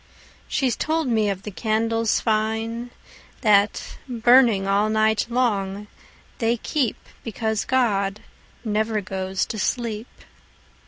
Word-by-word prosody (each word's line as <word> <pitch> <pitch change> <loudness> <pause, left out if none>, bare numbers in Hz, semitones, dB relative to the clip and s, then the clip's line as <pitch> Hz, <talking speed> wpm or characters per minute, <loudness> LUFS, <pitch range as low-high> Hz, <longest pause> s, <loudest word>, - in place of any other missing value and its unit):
She's 260 -4 0
told 315 -1 -1
me 220 -4 +2
of 195 -1 -4
the 210 - -6
candles 225 +2 0
fineThat, 220 -1 -1
burning 240 -4 +4
all 200 +2 +2
night 220 0 +2
long, 210 -5 0 0.5
they 235 0 +1
keepBecause 225 -4 -3
God 210 -5 +1 0.4
never 215 0 0
goes 190 0 -2
to 220 - -5
sleep. 230 +1 -2
220 Hz, 100 wpm, -23 LUFS, 205-235 Hz, 0.5 s, burning